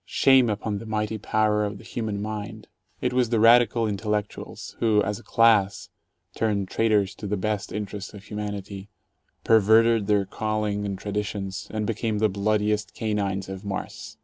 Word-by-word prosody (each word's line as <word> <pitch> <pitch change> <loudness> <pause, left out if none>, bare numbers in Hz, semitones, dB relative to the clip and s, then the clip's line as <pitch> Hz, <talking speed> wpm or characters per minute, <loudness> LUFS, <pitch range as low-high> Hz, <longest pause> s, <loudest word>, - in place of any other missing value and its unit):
Shame 130 -3 +4
upon 105 0 -2
the 115 - -9
mighty 110 0 -2
power 105 +1 +1
of 100 -1 -3
the - - -14
human 105 -3 -4
mind! 105 -1 -6 0.3
It - - 0
was 125 -2 +2
the 115 -2 +1
"radical 115 0 +5
intellectuals" 105 0 -4
who, 110 -3 +3
as 100 0 -3
a - - -16
class, 110 -4 +3 0.4
turned 100 -4 -1
traitors 105 -3 +1
to 105 - -7
the 105 +1 -1
best 105 +1 -2
inte 105 +1 -4
rests 100 -1 -6
of 100 - -11
humanity, 100 -2 -6 0.5
perverted 110 0 +4
their 105 -2 +2
calling 105 0 -2
and 100 -1 -3
traditions, 100 0 -4
and 110 -1 -3
became 110 0 -1
the 110 +1 +2
bloodiest 105 +1 0
canines 100 -3 -2
of 95 +1 -7
Mars. 100 -2 -6
105 Hz, 165 wpm, -25 LUFS, 100-110 Hz, 0.5 s, radical